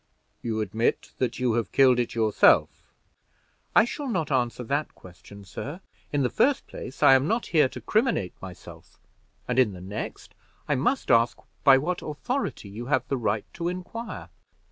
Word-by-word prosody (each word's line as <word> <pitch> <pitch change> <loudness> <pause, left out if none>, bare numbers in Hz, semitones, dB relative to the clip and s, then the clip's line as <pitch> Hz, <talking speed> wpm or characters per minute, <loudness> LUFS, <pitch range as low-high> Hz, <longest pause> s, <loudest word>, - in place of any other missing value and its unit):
"You 110 -2 -2
admit 110 +3 -1
that 125 -2 -1
you 125 -3 +1
have 110 -5 -1
killed 130 -3 +5
it 120 - -2
yourself." 110 -2 +3 0.8
"I - - +7
shall 280 +3 -5
not 160 -10 -1
answer 125 -2 0
that 140 +5 -2
question, 100 +3 -14
sir; 140 - -7 0.3
in 145 -1 +1
the 125 - +1
first 280 +1 +2
place, 130 +1 -7
I - - +8
am 135 +2 +4
not 230 +5 0
here 150 -5 +5
to - - -8
criminate 220 - 0
myself; 95 -2 -12 0.5
and, 125 +1 +1
in 115 -6 +3
the 90 - -9
next, 100 +4 -7 0.3
I 150 - +2
must 145 - 0
know 115 0 +6 0.4
by 135 -2 +8
what 175 +6 -2
authority 240 - -3
you 110 +5 -7
have 145 - +1
the 135 - 0
right 110 -3 -1
to 170 0 -3
inquire." 185 +6 -6
130 Hz, 170 wpm, -26 LUFS, 110-165 Hz, 0.8 s, I